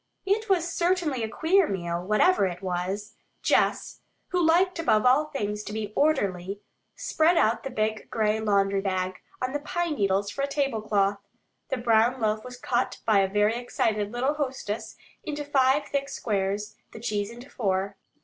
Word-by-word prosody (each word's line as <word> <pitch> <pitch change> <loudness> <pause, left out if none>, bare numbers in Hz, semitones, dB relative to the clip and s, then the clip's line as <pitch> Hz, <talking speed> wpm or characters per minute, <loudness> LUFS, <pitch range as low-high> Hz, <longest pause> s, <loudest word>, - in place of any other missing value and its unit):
It 425 +3 0
was 350 -3 +2
certainly 340 -7 +1
a 220 - -2
queer 335 - +3
meal, 175 -2 -3
whatever 210 - +3
it 180 +1 -7
was. 190 +3 -3 0.3
Jess, - - +1 0.3
who 360 -1 +1
liked 350 +2 +3
above 220 -9 +2
all 265 +5 +5
things 210 -8 -3
to 210 - -6
be 210 -1 -4
orderly, 200 - +1 0.4
spread 340 -9 +2
out 225 -5 +3
the 270 - -5
big 215 -3 -2
gray 215 -1 +1
laundry 200 -2 +2
bag 185 -1 -2 0.2
on 255 +1 -1
the 290 - -1
pine 340 +2 -2
needles 200 -4 0
for 275 - -4
a 280 - +1
tablecloth. 215 -8 0 0.5
The 265 - -1
brown 235 +1 +3
loaf 215 -1 0
was 250 0 -9
cut 245 0 -1
by 215 -3 +4
a 195 - +3
very 210 +2 +2
excited 215 -4 -1
little 255 +4 0
hostess 260 -8 -4 0.3
into 295 -1 -4
five 275 0 +3
thick 275 0 -1
squares; 205 -2 -2 0.2
the - - -8
cheese 210 -2 -2
into 240 +4 -12
four. 195 -2 -1
225 Hz, 170 wpm, -26 LUFS, 205-285 Hz, 0.5 s, all